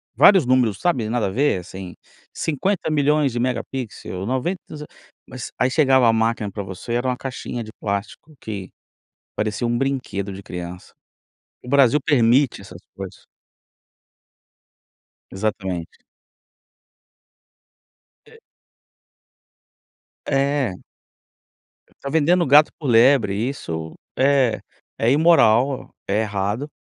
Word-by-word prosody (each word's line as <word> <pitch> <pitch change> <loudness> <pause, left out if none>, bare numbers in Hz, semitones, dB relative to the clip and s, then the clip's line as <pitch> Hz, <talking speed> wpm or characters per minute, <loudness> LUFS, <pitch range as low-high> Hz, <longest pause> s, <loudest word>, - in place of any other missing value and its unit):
vários 190 -7 +6
números, 125 -5 +2
sabe. 125 -12 0
Nada 120 -2 0
a - - -2
ver, 125 0 +1
assim, 90 0 -9 0.4
50.000.000 150 -3 0
de 120 - -3
megapixels, 120 -6 -4
90 130 +9 -1
não - - -8
s 150 - -8 0.4
mas 130 - -8
aí 125 - +3
chegava 130 -3 +4
a 115 - +4
máquina 115 -2 0
pra 100 +1 -5
você, 95 +4 -7
era 120 +2 0
uma 125 - 0
caixinha 125 -2 -5
de 110 - -11
plástico 100 +9 -5
que 100 -4 -6 0.7
parecia 105 +2 -2
um 120 0 0
brinquedo 125 -7 -2
de 95 +1 -9
criança. 90 0 -8 0.7
O - - -12
Brasil 140 0 +4
permite 130 -3 +3
essas 90 -2 -12
coisas. 95 -2 -9 2.1
Exatamente. 95 -4 -3 2.3
E. 455 0 -17 1.9
É. 140 -6 0 1.3
Tá 140 - -4
vendendo 165 +4 +3
gato 145 +3 +6
por 145 - -5
lebre, 120 -3 +4
isso 80 - -5 0.2
é 130 -5 +3 0.4
é 115 +2 +2
imoral, 135 -4 +3
é 100 +3 +1
errado 105 +6 -2
120 Hz, 110 wpm, -21 LUFS, 100-140 Hz, 2.3 s, vários